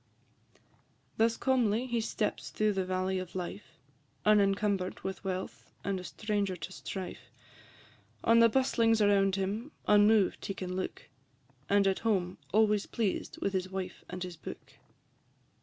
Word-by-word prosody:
Thus 225 +1 +3
calmly 245 -3 +2
he 240 -2 -1
steps 220 -1 -2
through 215 -1 +1
the 190 -1 -1
valley 185 0 -1
of 185 -1 -7
life, 185 +2 -6 0.5
Unencumber'd 200 -2 +2
with 190 0 -5
wealth, 185 -1 -5
and 195 -1 -1
a - - -8
stranger 205 -1 -2
to 175 +2 -7
strife; 190 -1 -7 0.9
On 230 0 +5
the 230 0 +7
bustlings 230 -2 +3
around 200 -2 +4
him 205 +8 -2 0.2
unmoved 210 -1 +4
he 195 - -3
can 185 -1 -4
look, 185 - -4 0.6
And 200 0 +4
at 195 -1 +2
home 190 -5 0
always 210 0 +3
pleased 215 -5 -2
with 200 - 0
his 185 0 -1
wife 185 -1 -5
and 180 0 -5
his 180 -2 -7
book. - - -9
200 Hz, 140 wpm, -31 LUFS, 185-215 Hz, 0.9 s, the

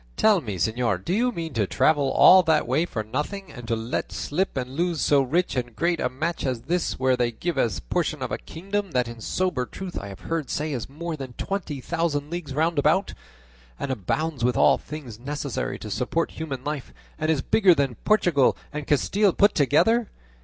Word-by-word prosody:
"Tell 210 -5 +4
me, 105 -8 -5
señor, 105 0 0
do 175 - 0
you 245 +5 +2
mean 165 - -5
to 105 -5 0
travel 145 +3 +2
all 185 +7 +8
that 160 -6 +2
way 150 +8 +1
for 110 - -3
nothing, 150 - -4
and 120 -4 -10
to 115 - +1
let 115 +2 -3
slip 180 +1 -2
and 125 0 -3
lose 170 +3 -1
so 145 -2 +4
rich 165 +8 0
and 120 -2 -3
great 170 -1 +1
a 125 - 0
match 160 +7 -3
as 125 -4 -2
this 175 +1 -1
where 130 0 +2
they 120 -1 0
give 170 +9 -3
as 110 -6 +1
a - - -7
portion - - -1
a - - -2
kingdom 195 +1 -4
that 125 -2 +1
in 120 -1 -9
sober 160 -4 -1
truth 190 -2 -6
I 100 - -7
have 100 -1 -10
heard 165 -3 -3
say 150 0 -2
is 125 -2 -4
more 165 +4 -5
than 135 -4 -7
twenty 170 -8 -4
thousand 155 -2 -1
leagues 165 -6 -5
round 160 +1 +1
about, 155 +7 +2 0.7
and 135 - -2
abounds 135 - -2
with 125 -1 +2
all - - +5
things 135 -8 -8
necessary 140 0 -3
to 105 - -8
support 125 +11 -1
human 140 -5 -5
life, 150 -2 -4 0.3
and 155 - -1
is 150 -4 +1
bigger 190 -6 +5
than 140 -4 0
Portugal 175 -10 +3 0.2
and 150 -1 -5
Castile 195 +7 +2
put 205 0 +4
together? 175 - +3
150 Hz, 205 wpm, -25 LUFS, 125-170 Hz, 0.7 s, all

